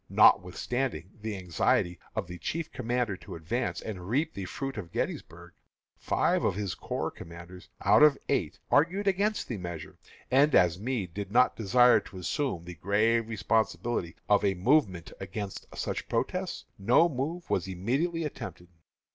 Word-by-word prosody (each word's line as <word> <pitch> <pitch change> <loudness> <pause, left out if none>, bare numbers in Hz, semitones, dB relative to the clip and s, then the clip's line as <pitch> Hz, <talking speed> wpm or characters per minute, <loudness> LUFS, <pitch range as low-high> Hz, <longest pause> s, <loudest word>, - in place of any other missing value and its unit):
Notwithstanding 100 +2 +2
the 110 -2 -3
anxiety 90 -1 +1 0.2
of - - -1
the 90 0 -9
chief 165 0 -3
commander 120 -4 -1
to - - -9
advance 115 +10 -2
and 95 -4 -6
reap 150 +7 +1
fully 100 - -5
the - - -8
fruit 135 -1 -4
of 85 -4 -8
Gettysburg, - - -4 0.4
five - - +1
of - - +1
his 100 -3 -2
corps - - -3
commanders, 85 +2 -11 0.2
out - - +6
of 150 -2 +7
eight, - - 0
argued 180 +7 +3
against 200 +3 +1
the 115 - -3
measure, 85 -3 -7 0.3
and 140 +3 +5
as 90 0 +4
Meade 105 -6 -3
did 100 +1 -5
not 125 +3 +4
desire 120 +3 +5
to 95 - -12
assume 90 - -2
the 90 - -7
grave 110 +6 +1
responsibility 110 -3 0
of 105 - +4
a 100 -1 +2
movement 95 - +2
against 95 +1 -6
such - - -3
protests, - - -2
no 120 +12 +5
move 160 +4 -3
was 95 - +1
immediately 135 - -1
attempted. 90 - -7
110 Hz, 155 wpm, -29 LUFS, 90-135 Hz, 0.4 s, of